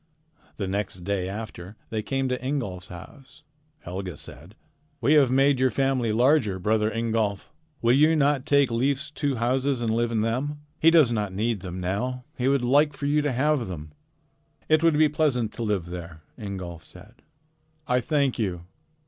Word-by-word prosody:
The 100 Hz, -, -3 dB
next 95 Hz, -1 st, -3 dB
day 95 Hz, 0 st, -2 dB
after 105 Hz, -2 st, -7 dB, 0.2 s
they 110 Hz, -1 st, -1 dB
came 135 Hz, +4 st, -1 dB
to 125 Hz, 0 st, -3 dB
Ingolf's 120 Hz, -10 st, -3 dB
house, 130 Hz, -, -13 dB, 0.4 s
Helga 90 Hz, -2 st, -6 dB
said: 85 Hz, -, -10 dB, 0.4 s
"We 135 Hz, +4 st, +3 dB
have 145 Hz, -4 st, +5 dB
made 135 Hz, +1 st, +3 dB
your 130 Hz, 0 st, +3 dB
family 135 Hz, -4 st, 0 dB
larger, 120 Hz, -3 st, +3 dB
brother 105 Hz, +3 st, +1 dB
Ingolf. 110 Hz, -3 st, -2 dB, 0.3 s
Will 120 Hz, +1 st, +5 dB
you 155 Hz, +4 st, +5 dB
not 145 Hz, -3 st, +1 dB
take 140 Hz, -4 st, +3 dB
Leif's 135 Hz, +5 st, 0 dB
two 145 Hz, -2 st, -1 dB
houses 130 Hz, +3 st, 0 dB
and 115 Hz, -2 st, 0 dB
live 120 Hz, +1 st, 0 dB
in 110 Hz, -2 st, +1 dB
them? 135 Hz, +7 st, -2 dB, 0.2 s
He 165 Hz, -, +6 dB
does 160 Hz, -7 st, +5 dB
not 105 Hz, -4 st, -2 dB
need 110 Hz, +1 st, 0 dB
them 90 Hz, 0 st, -6 dB
now. 125 Hz, +8 st, -2 dB
He 125 Hz, -1 st, -1 dB
would 135 Hz, -2 st, +2 dB
like 140 Hz, +3 st, +3 dB
you 145 Hz, +1 st, +2 dB
to 145 Hz, -1 st, 0 dB
have 135 Hz, 0 st, +1 dB
them." 80 Hz, -4 st, -7 dB, 0.8 s
"It 155 Hz, 0 st, +4 dB
would 165 Hz, -2 st, +3 dB
be 155 Hz, 0 st, +5 dB
pleasant 145 Hz, -7 st, 0 dB
to 120 Hz, -, -4 dB
live 105 Hz, -6 st, -1 dB
there," 85 Hz, -2 st, -8 dB
Ingolf 95 Hz, -6 st, -7 dB
said. 105 Hz, +7 st, -15 dB, 0.6 s
"I 125 Hz, -1 st, +1 dB
thank 140 Hz, -1 st, 0 dB
you." 90 Hz, -6 st, -2 dB
120 Hz, 175 wpm, -25 LUFS, 100-140 Hz, 0.8 s, He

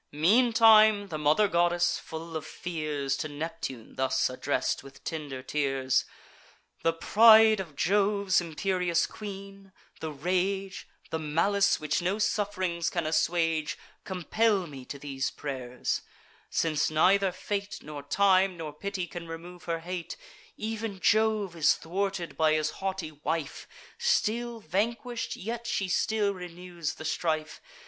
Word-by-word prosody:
Meantime 215 Hz, -, +5 dB
the 155 Hz, -, -3 dB
mother 155 Hz, +8 st, +4 dB
goddess, 175 Hz, -1 st, +2 dB
full 165 Hz, +1 st, -8 dB
of 155 Hz, -, -3 dB
fears, 155 Hz, -6 st, -3 dB
To 155 Hz, -, -3 dB
Neptune 150 Hz, -5 st, -6 dB
thus 130 Hz, -1 st, +1 dB
address'd, 130 Hz, +1 st, -1 dB
with 135 Hz, 0 st, -15 dB
tender 145 Hz, -5 st, -5 dB
tears: 135 Hz, -2 st, 0 dB, 0.8 s
"The 165 Hz, -, +3 dB
pride 220 Hz, +5 st, +6 dB
of 165 Hz, -6 st, -6 dB
Jove's 200 Hz, +1 st, +2 dB
imperious 175 Hz, +1 st, 0 dB
queen, 195 Hz, -1 st, -9 dB, 0.3 s
the 160 Hz, -, -4 dB
rage, 185 Hz, +5 st, -2 dB, 0.2 s
The 160 Hz, -, -1 dB
malice 195 Hz, +6 st, +2 dB
which 150 Hz, +1 st, -1 dB
no 185 Hz, +4 st, 0 dB
suff'rings 185 Hz, -6 st, 0 dB
can 170 Hz, -2 st, -2 dB
assuage, 160 Hz, 0 st, +1 dB, 0.3 s
Compel 195 Hz, +2 st, +1 dB
me 135 Hz, -5 st, -10 dB
to 140 Hz, -, -7 dB
these 135 Hz, -2 st, -3 dB
pray'rs; 125 Hz, -3 st, -4 dB, 0.5 s
since 155 Hz, -2 st, +1 dB
neither 190 Hz, +5 st, +4 dB
fate, 200 Hz, +2 st, -4 dB
Nor 150 Hz, -1 st, -7 dB
time, 190 Hz, +4 st, +3 dB
nor 155 Hz, -2 st, -6 dB
pity, 195 Hz, +3 st, -4 dB
can 175 Hz, -1 st, -8 dB
remove 170 Hz, +2 st, -9 dB
her 165 Hz, -1 st, -2 dB
hate: 175 Hz, 0 st, -5 dB, 0.4 s
Ev'n 220 Hz, -2 st, -4 dB
Jove 215 Hz, -3 st, +2 dB
is 155 Hz, -3 st, +4 dB
thwarted 190 Hz, 0 st, -3 dB
by 155 Hz, -1 st, +3 dB
his 155 Hz, 0 st, +1 dB
haughty 190 Hz, -4 st, -4 dB
wife; 150 Hz, 0 st, -4 dB, 0.3 s
Still 240 Hz, -, 0 dB
vanquish'd, 230 Hz, +4 st, -2 dB
yet 235 Hz, +4 st, -5 dB
she 195 Hz, -4 st, -1 dB
still 205 Hz, +2 st, +1 dB
renews 180 Hz, -2 st, -6 dB
the 160 Hz, -, -9 dB
strife. 155 Hz, -1 st, -2 dB
175 Hz, 130 wpm, -28 LUFS, 155-200 Hz, 0.8 s, pride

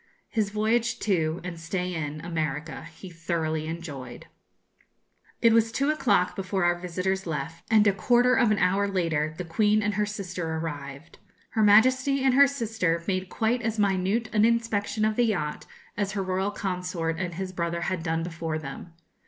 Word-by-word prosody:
His 215 Hz, -4 st, 0 dB
voyage 220 Hz, +3 st, +1 dB
to, 165 Hz, -5 st, 0 dB
and 175 Hz, -2 st, -6 dB
stay 180 Hz, +2 st, -3 dB
in 150 Hz, -2 st, -4 dB
America, 160 Hz, -2 st, -3 dB
he 190 Hz, -, -11 dB
thoroughly 165 Hz, -2 st, -2 dB
enjoyed. 145 Hz, -7 st, -7 dB, 1.2 s
It 230 Hz, -1 st, +6 dB
was 225 Hz, 0 st, +3 dB
two 275 Hz, +5 st, +1 dB
o'clock 205 Hz, -11 st, +2 dB
before 190 Hz, -1 st, -2 dB
our 175 Hz, 0 st, +4 dB
visitors 185 Hz, +2 st, -2 dB
left; 165 Hz, +2 st, -4 dB
and 215 Hz, -2 st, +5 dB
a 200 Hz, -, +4 dB
quarter 245 Hz, +5 st, +3 dB
of 245 Hz, -3 st, +4 dB
an 215 Hz, -, +2 dB
hour 195 Hz, +2 st, +2 dB
later 160 Hz, -5 st, -1 dB
the 180 Hz, -, -4 dB
Queen 210 Hz, +5 st, +2 dB
and 210 Hz, 0 st, 0 dB
her 210 Hz, +1 st, 0 dB
sister 180 Hz, -5 st, -4 dB
arrived. 145 Hz, -1 st, -7 dB, 0.3 s
Her 220 Hz, -, 0 dB
Majesty 255 Hz, +6 st, +5 dB
and 265 Hz, -1 st, +4 dB
her 280 Hz, +2 st, +7 dB
sister 220 Hz, -11 st, -1 dB
made 185 Hz, -1 st, -1 dB
quite 230 Hz, +4 st, 0 dB
as 225 Hz, -1 st, -2 dB
minute 200 Hz, +2 st, +1 dB
an 210 Hz, -1 st, +4 dB
inspection 225 Hz, -2 st, +1 dB
of 215 Hz, 0 st, 0 dB
the 245 Hz, -, +4 dB
yacht 175 Hz, -9 st, -2 dB, 0.3 s
as 200 Hz, -1 st, -2 dB
her 200 Hz, -2 st, -1 dB
royal 190 Hz, +1 st, -1 dB
consort 180 Hz, -4 st, -3 dB
and 175 Hz, -3 st, -3 dB
his 185 Hz, +1 st, -5 dB
brother 170 Hz, -1 st, -2 dB
had 185 Hz, -1 st, -2 dB
done 165 Hz, 0 st, -1 dB
before 165 Hz, -2 st, -3 dB
them. 155 Hz, +3 st, -8 dB
185 Hz, 175 wpm, -26 LUFS, 165-215 Hz, 1.2 s, her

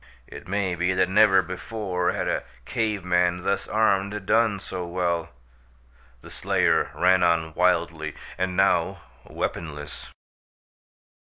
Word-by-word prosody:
It -, -, -11 dB
may 95 Hz, -1 st, -1 dB
be 90 Hz, +2 st, 0 dB
that 95 Hz, 0 st, +2 dB
never 95 Hz, -1 st, +5 dB
before 95 Hz, +1 st, -3 dB
had -, -, -3 dB
a -, -, 0 dB, 0.2 s
cave 105 Hz, -5 st, -2 dB
man, 90 Hz, 0 st, +1 dB
thus 100 Hz, -, -1 dB
armed, 100 Hz, -2 st, +1 dB
done 110 Hz, -2 st, +2 dB
so 95 Hz, -1 st, -5 dB
well. 85 Hz, -1 st, -2 dB, 0.9 s
The -, -, -12 dB
slayer -, -, +1 dB
ran 90 Hz, +1 st, +4 dB
on 85 Hz, -2 st, +2 dB
wildly, 85 Hz, -3 st, 0 dB, 0.2 s
and 90 Hz, 0 st, -2 dB
now 95 Hz, -1 st, +2 dB, 0.3 s
weaponless. 75 Hz, -3 st, -5 dB
90 Hz, 120 wpm, -25 LUFS, 85-95 Hz, 0.9 s, never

